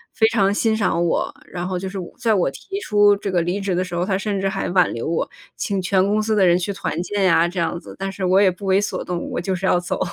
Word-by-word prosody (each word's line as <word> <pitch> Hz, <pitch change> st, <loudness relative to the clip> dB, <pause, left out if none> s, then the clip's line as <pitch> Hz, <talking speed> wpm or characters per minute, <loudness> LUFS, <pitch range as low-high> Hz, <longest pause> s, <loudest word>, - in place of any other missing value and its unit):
非 220 Hz, -, +4 dB
常 200 Hz, -4 st, +2 dB
欣 220 Hz, +2 st, +1 dB
赏 185 Hz, -5 st, +1 dB
我， 170 Hz, -, 0 dB
然 175 Hz, 0 st, -5 dB
后 185 Hz, -1 st, -2 dB
就 190 Hz, +1 st, -4 dB
是 195 Hz, 0 st, -5 dB
我 175 Hz, -, -7 dB
在 225 Hz, -2 st, +1 dB
我 185 Hz, -8 st, +2 dB
提 390 Hz, -, -7 dB
出 205 Hz, -, +4 dB
这 200 Hz, -, -4 dB
个 180 Hz, -2 st, +2 dB
离 175 Hz, +4 st, -1 dB
职 195 Hz, -2 st, -1 dB
的 180 Hz, -, +1 dB
时 180 Hz, -1 st, -8 dB
候， 175 Hz, +1 st, 0 dB
他 190 Hz, 0 st, 0 dB
甚 200 Hz, 0 st, -2 dB
至 195 Hz, -, 0 dB
还 -, -, -3 dB
挽 180 Hz, -1 st, +3 dB
留 115 Hz, -, -4 dB
我。 165 Hz, +1 st, -1 dB, 0.3 s
请 195 Hz, -2 st, -1 dB
全 185 Hz, +1 st, +2 dB
公 210 Hz, +1 st, +2 dB
司 220 Hz, -, 0 dB
的 200 Hz, -2 st, +4 dB
人 175 Hz, 0 st, +5 dB
去 180 Hz, +2 st, -2 dB
团 195 Hz, -3 st, -3 dB
建 205 Hz, +1 st, -1 dB
呀， 170 Hz, -2 st, +4 dB
这 180 Hz, +1 st, -4 dB
样 170 Hz, 0 st, -1 dB
子， -, -, -11 dB
但 195 Hz, -, -2 dB
是 195 Hz, 0 st, -6 dB
我 185 Hz, +1 st, +4 dB
也 195 Hz, -, +5 dB
不 185 Hz, +3 st, -7 dB
为 190 Hz, 0 st, +3 dB
所 205 Hz, -, -2 dB
动， 175 Hz, -1 st, -4 dB
我 -, -, -2 dB
就 190 Hz, +2 st, -2 dB
是 185 Hz, +1 st, -3 dB
要 180 Hz, -, +4 dB
走。 175 Hz, -, -3 dB
190 Hz, 320 characters per minute, -21 LUFS, 175-200 Hz, 0.3 s, 人